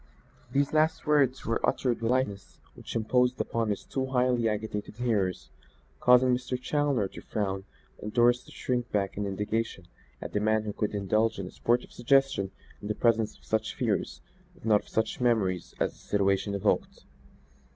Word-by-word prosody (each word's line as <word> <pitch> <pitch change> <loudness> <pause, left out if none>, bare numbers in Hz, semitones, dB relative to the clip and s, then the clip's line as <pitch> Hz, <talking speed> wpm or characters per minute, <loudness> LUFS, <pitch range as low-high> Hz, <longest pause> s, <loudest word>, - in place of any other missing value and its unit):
These 140 +1 +1
last 155 +1 +2
words 140 -4 +2
were 115 - -1
uttered 120 -3 +1
with 115 - 0
a - - +3
lightness 115 -7 -2
which - - -9
imposed 125 +3 +2
upon 115 -2 -1
his 100 - -2
two 130 -1 -2
highly 125 -3 +2
agitated 105 0 -4
hearers, 105 -7 -1 0.5
causing 125 - +5
Mr. 125 0 -3
Challoner 140 -5 +1
to - - -10
frown 95 -3 -3 0.4
and 105 - -5
Doris 120 +1 +4
to - - -15
shrink 125 -1 -2
back 100 -2 0
in 100 0 -2
indignation 105 0 -2 0.3
at - - -7
the 105 - +1
man 110 +1 +2
who 105 -1 -4
could 105 0 -2
indulge 110 +3 +1
in 100 - -4
a 90 - -8
sportive 120 +1 0
suggestion 135 -6 +2 0.3
in 105 0 -3
presence 115 -2 +1
of - - -27
such 110 0 -1
fears, - - -1 0.3
if - - -16
not 105 -2 +4
of - - -20
such 110 +2 -1
memories, 100 -8 +1
as - - +1
the - - -21
situation 100 0 0
evoked. 100 - 0
115 Hz, 175 wpm, -28 LUFS, 105-125 Hz, 0.5 s, causing